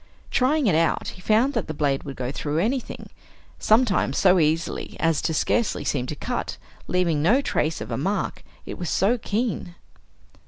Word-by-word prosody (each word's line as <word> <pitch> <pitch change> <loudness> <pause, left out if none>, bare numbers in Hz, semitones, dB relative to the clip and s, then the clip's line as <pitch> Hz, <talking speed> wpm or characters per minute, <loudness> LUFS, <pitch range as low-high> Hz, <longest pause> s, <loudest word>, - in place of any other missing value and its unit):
Trying 280 +3 +2
it 195 - +3
out 165 +1 +1
he 185 - -11
found 225 +8 +2
that - - -2
the 155 - -5
blade 140 -2 0
would 140 -2 -6
go 125 0 -3
through 150 +1 -3
anything, 235 +8 -2 0.5
sometimes 215 - +2
so 185 -1 +5
easily 160 +1 -1
as 165 -2 +2
to - - -1
scarcely 220 +7 0
seem 130 -3 -1
to 150 - -4
cut, - - -4 0.3
leaving 170 -5 +1
no 220 - +4
trace 160 - -1
of 105 +3 -6
a 115 - -1
mark, 195 +6 -2 0.2
it - - -7
was 175 - -3
so 225 +6 +2
keen. 210 -5 -2
175 Hz, 180 wpm, -24 LUFS, 150-220 Hz, 0.5 s, so